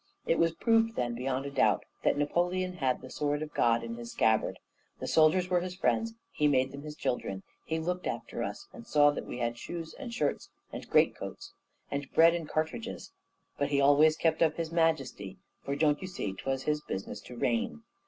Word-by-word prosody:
It 165 Hz, -, +2 dB
was 165 Hz, 0 st, +3 dB
proved 225 Hz, +2 st, +3 dB
then, 120 Hz, -1 st, -1 dB
beyond 130 Hz, +2 st, -2 dB
a 140 Hz, -, -4 dB
doubt, 110 Hz, -7 st, +2 dB, 0.2 s
that -, -, +2 dB
Napoleon 180 Hz, +5 st, 0 dB
had 130 Hz, -4 st, 0 dB
the 130 Hz, -, -10 dB
sword 145 Hz, 0 st, -1 dB
of 150 Hz, -, -8 dB
God 115 Hz, 0 st, +3 dB
in 115 Hz, 0 st, -5 dB
his 120 Hz, 0 st, -7 dB
scabbard. 110 Hz, -1 st, +2 dB, 0.4 s
The -, -, -4 dB
soldiers 160 Hz, +3 st, +4 dB
were 180 Hz, -, +4 dB
his 180 Hz, +1 st, -5 dB
friends; 225 Hz, +4 st, 0 dB, 0.2 s
he 150 Hz, -, +2 dB
made 130 Hz, -2 st, +2 dB
them 140 Hz, -, -8 dB
his 150 Hz, 0 st, -8 dB
children; 95 Hz, -9 st, -2 dB, 0.2 s
he 160 Hz, -, -1 dB
looked 180 Hz, +3 st, -2 dB
after -, -, -4 dB
us, 400 Hz, -, -5 dB
he 235 Hz, -, -9 dB
saw 145 Hz, -8 st, +5 dB
that 145 Hz, -, -6 dB
we -, -, -5 dB
had 120 Hz, -1 st, -2 dB
shoes, 165 Hz, -2 st, -6 dB
and 270 Hz, -4 st, -7 dB
shirts, 150 Hz, -11 st, -1 dB, 0.2 s
and -, -, -7 dB
great -, -, +4 dB
coats, -, -, -8 dB, 0.4 s
and 140 Hz, -1 st, -3 dB
bread, 165 Hz, +1 st, +7 dB
and 165 Hz, -3 st, -4 dB
cartridges; 160 Hz, -, -3 dB, 0.5 s
but 140 Hz, 0 st, +1 dB
he 140 Hz, -1 st, +2 dB
always 145 Hz, +3 st, +5 dB
kept 160 Hz, -1 st, +1 dB
up 160 Hz, -2 st, +4 dB
his 165 Hz, -1 st, -3 dB
majesty; 140 Hz, -, 0 dB, 0.3 s
for, 140 Hz, -, -2 dB
don't 150 Hz, 0 st, +2 dB
you 185 Hz, -, -4 dB
see, 105 Hz, -, -4 dB
'twas 135 Hz, +6 st, -3 dB
his 150 Hz, 0 st, 0 dB
business 100 Hz, -4 st, -5 dB
to 125 Hz, -, -11 dB
reign. 115 Hz, -12 st, -1 dB
150 Hz, 205 wpm, -30 LUFS, 130-170 Hz, 0.5 s, bread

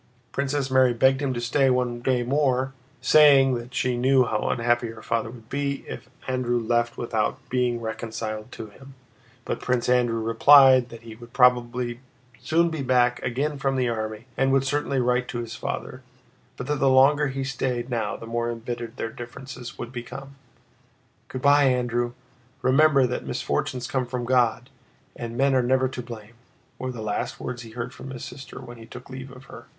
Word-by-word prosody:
Princess 140 Hz, -1 st, -1 dB
Mary 130 Hz, -2 st, +4 dB
begged 130 Hz, +3 st, +3 dB
him 140 Hz, -2 st, 0 dB
to 120 Hz, -, -3 dB
stay 130 Hz, +3 st, +2 dB
one 125 Hz, -1 st, 0 dB
day 125 Hz, -1 st, +1 dB
more, 130 Hz, 0 st, +1 dB, 0.3 s
saying 135 Hz, -1 st, +6 dB
that 120 Hz, +1 st, -5 dB
she 125 Hz, -1 st, 0 dB
knew 130 Hz, +1 st, +4 dB
how -, -, -1 dB
unhappy 120 Hz, 0 st, +1 dB
her 115 Hz, -1 st, -10 dB
father 115 Hz, -1 st, -1 dB
would 115 Hz, -1 st, -13 dB
be 140 Hz, +1 st, -3 dB
if -, -, -8 dB, 0.2 s
Andrew 125 Hz, -2 st, 0 dB
left 120 Hz, +1 st, 0 dB
without 110 Hz, -3 st, -1 dB
being 125 Hz, -2 st, 0 dB
reconciled 110 Hz, 0 st, -5 dB
to 115 Hz, -, -7 dB
him, 135 Hz, +6 st, -15 dB, 0.5 s
but -, -, -3 dB
Prince 125 Hz, -1 st, -1 dB
Andrew 120 Hz, -2 st, +2 dB
replied 130 Hz, +3 st, +6 dB
that 115 Hz, 0 st, -11 dB
he 115 Hz, -1 st, -9 dB
would 120 Hz, +1 st, -14 dB
probably 125 Hz, -1 st, +2 dB, 0.4 s
soon 165 Hz, +7 st, +2 dB
be 160 Hz, -3 st, -3 dB
back 125 Hz, -1 st, +2 dB
again 140 Hz, +4 st, -2 dB
from 135 Hz, 0 st, 0 dB
the 125 Hz, -2 st, +1 dB
army 110 Hz, 0 st, -4 dB
and 135 Hz, 0 st, +2 dB
would 135 Hz, 0 st, +3 dB
certainly 140 Hz, 0 st, -1 dB
write 125 Hz, 0 st, +1 dB
to 120 Hz, -, -5 dB
his 120 Hz, -1 st, -5 dB
father, 130 Hz, -, -5 dB, 0.6 s
but 125 Hz, -, -5 dB
that 150 Hz, +2 st, -1 dB
the 135 Hz, -, +4 dB
longer 140 Hz, +3 st, +5 dB
he 135 Hz, 0 st, -3 dB
stayed 125 Hz, -2 st, -2 dB
now 115 Hz, -3 st, -1 dB
the -, -, -9 dB
more 115 Hz, +1 st, -2 dB
embittered 120 Hz, 0 st, -5 dB
their 115 Hz, -, -3 dB
differences 125 Hz, +1 st, -9 dB
would 120 Hz, -, -6 dB
become. 135 Hz, +3 st, -8 dB, 0.9 s
"Good 130 Hz, -, -7 dB
by, 145 Hz, 0 st, +6 dB
Andrew! 120 Hz, -2 st, 0 dB, 0.5 s
Remember 140 Hz, 0 st, +5 dB
that 125 Hz, 0 st, -3 dB
misfortunes 125 Hz, -2 st, -2 dB
come 130 Hz, -1 st, -2 dB
from 120 Hz, -1 st, -3 dB
God, 125 Hz, 0 st, +1 dB, 0.4 s
and 120 Hz, -1 st, -6 dB
men 135 Hz, +1 st, +3 dB
are 130 Hz, -, +4 dB
never 130 Hz, +1 st, +2 dB
to 125 Hz, -, -6 dB
blame," 115 Hz, -2 st, -10 dB, 0.5 s
were 130 Hz, 0 st, -3 dB
the 115 Hz, -3 st, -7 dB
last 105 Hz, -1 st, -3 dB
words 125 Hz, -1 st, -5 dB
he 115 Hz, -, -10 dB
heard 120 Hz, +1 st, -4 dB
from 135 Hz, -, -9 dB
his 130 Hz, -2 st, -7 dB
sister 135 Hz, -1 st, -9 dB
when 120 Hz, -2 st, -10 dB
he 115 Hz, 0 st, -12 dB
took 125 Hz, +2 st, -11 dB
leave 130 Hz, 0 st, -8 dB
of 130 Hz, 0 st, -13 dB
her. -, -, -12 dB
125 Hz, 185 wpm, -25 LUFS, 120-135 Hz, 0.9 s, saying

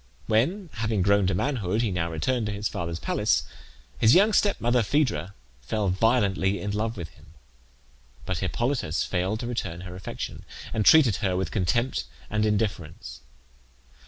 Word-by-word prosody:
When, 160 Hz, -, 0 dB
having 110 Hz, -3 st, 0 dB
grown 100 Hz, 0 st, +3 dB
to 95 Hz, -, +1 dB
manhood, 110 Hz, -3 st, 0 dB
he 110 Hz, -, 0 dB
now 85 Hz, -2 st, -1 dB
returned 110 Hz, +9 st, -1 dB
to -, -, -2 dB
his 105 Hz, 0 st, -2 dB
father's 85 Hz, -1 st, -4 dB
palace, -, -, +1 dB, 0.6 s
his 110 Hz, +1 st, +6 dB
young 205 Hz, +4 st, +5 dB
stepmother, 125 Hz, -, +2 dB
Phaedra, 115 Hz, -, 0 dB, 0.3 s
fell 100 Hz, -, -1 dB
violently 100 Hz, -1 st, +2 dB
in 100 Hz, -, -3 dB
love 110 Hz, +2 st, -2 dB
with 85 Hz, -3 st, -6 dB
him; -, -, -20 dB, 0.9 s
but -, -, -2 dB
Hippolytus 120 Hz, -, -1 dB
failed 95 Hz, +4 st, -1 dB
to -, -, -4 dB
return 100 Hz, -8 st, -4 dB
her 90 Hz, 0 st, -8 dB
affection, 90 Hz, -, -6 dB, 0.3 s
and 110 Hz, -1 st, +1 dB
treated 135 Hz, -, +6 dB
her 90 Hz, -1 st, 0 dB
with 95 Hz, -, -2 dB
contempt 120 Hz, +7 st, 0 dB, 0.3 s
and 105 Hz, 0 st, +1 dB
indifference. 100 Hz, -7 st, -3 dB
105 Hz, 155 wpm, -26 LUFS, 90-120 Hz, 0.9 s, his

